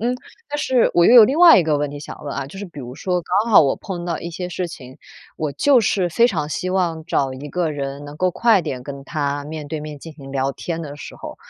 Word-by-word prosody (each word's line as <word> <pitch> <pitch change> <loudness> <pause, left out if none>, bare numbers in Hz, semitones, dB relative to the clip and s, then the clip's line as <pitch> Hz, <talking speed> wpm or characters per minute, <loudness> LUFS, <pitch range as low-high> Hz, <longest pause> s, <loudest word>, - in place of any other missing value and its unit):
嗯， 245 +3 0 0.3
但 295 - -3
是 260 -4 +2
我 170 - +5
又 - - +6
有 235 -3 +10
另 270 +7 0
外 340 - +9
一 170 - +2
个 155 -2 +1
问 145 0 -2
题 145 - -7
想 150 - -10
问 140 - -4
啊， 140 -1 -4
就 170 - -12
是 205 - -6
比 170 -6 -11
如 125 -1 -8
说， 180 +2 -1
刚 215 +6 0
好 215 - +8
我 140 -3 +2
碰 175 -4 -6
到 170 -2 -2
一 170 - -6
些 180 +2 -5
事 180 0 -3
情， 130 -3 -11 0.4
我 155 -2 -2
就 250 - +3
是 190 -3 +1
非 235 +8 +3
常 155 -7 -2
希 185 +4 -3
望 170 -4 -1
找 135 -6 0
一 145 +3 -8
个 170 -1 -1
人 140 0 -5
能 145 +1 -10
够 185 +2 +1
快 220 -2 +3
点 130 -5 -5
跟 140 -1 -7
他， 145 -1 -2
面 150 0 -7
对 155 +1 -5
面 150 -1 -8
进 160 +2 -10
行 135 -3 -12
聊 135 0 -1
天 165 +3 -5
的 145 -3 -7
时 145 - -10
候。 - - -9
160 Hz, 290 characters per minute, -20 LUFS, 145-185 Hz, 0.4 s, 有